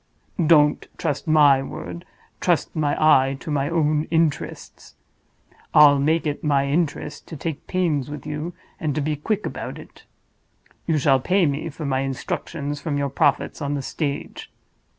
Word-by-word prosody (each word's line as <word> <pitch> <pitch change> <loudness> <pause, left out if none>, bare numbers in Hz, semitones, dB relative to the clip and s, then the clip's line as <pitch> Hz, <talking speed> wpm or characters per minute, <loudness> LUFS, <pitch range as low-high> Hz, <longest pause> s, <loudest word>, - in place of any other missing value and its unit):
Don't 150 -2 +4
trust 145 - -2
my 145 -3 +5
word: 90 -9 -7 0.3
trust - - 0
my 150 -2 +1
eye 135 -3 +4
to 155 - -6
my 145 -1 0
own 155 -2 +1
interests. 160 -2 -2 0.8
I'll 145 -2 +8
make 160 +4 +1
it 145 -1 -3
my 140 -2 +2
interest 150 0 -2
to 160 - -8
take 155 0 -5
pains 160 -7 0
with 145 -2 -7
you, 150 +3 -4 0.3
and 150 -3 -2
to 155 - 0
be 150 +1 -1
quick 205 +8 -2
about - - -5
it. - - -14 0.8
You 160 -2 +2
shall 135 -1 +3
pay 185 +7 +2
me 145 +2 -2
for 155 +1 -7
my 135 -1 0
instructions 140 +2 -4
from 150 -4 -2
your 140 0 -1
profits 140 +1 0
on 145 0 -1
the 140 - -3
stage. 140 0 -4
150 Hz, 160 wpm, -23 LUFS, 140-155 Hz, 0.8 s, I'll